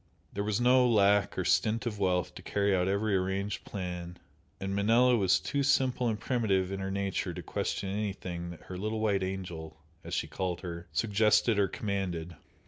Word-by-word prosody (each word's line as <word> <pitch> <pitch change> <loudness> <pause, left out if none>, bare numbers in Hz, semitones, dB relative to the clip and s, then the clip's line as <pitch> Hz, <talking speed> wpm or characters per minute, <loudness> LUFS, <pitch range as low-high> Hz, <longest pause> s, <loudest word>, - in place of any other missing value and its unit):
There 100 - -2
was 105 0 0
no 125 0 +5
lack 100 -2 +3
or 95 - -1
stint 105 +6 +2
of 105 -4 -3
wealth 90 -2 +1
to - - -10
carry 100 -1 +1
out 90 0 +1
every 100 +1 +1
arranged 95 +2 -1
plan, 90 -2 -5 0.4
and 95 0 -3
Manella 115 +5 +4
was 95 -5 +3
too 140 - -1
simple 130 -3 +2
and 110 -2 -1
primitive 100 -6 0
in 95 - -3
her 95 0 -3
nature 100 0 -2
to - - -6
question 100 - -2
anything 95 -4 -4
that 85 - -10
her 90 -1 -7
"little 110 +2 -2
white 105 -3 +1
angel" 90 -5 -5 0.3
as - - -4
she - - 0
called 90 -2 -3
her, 85 -2 -6
suggested 110 0 +3
or 100 - +4
commanded. 90 -5 -3
100 Hz, 185 wpm, -30 LUFS, 95-110 Hz, 0.4 s, no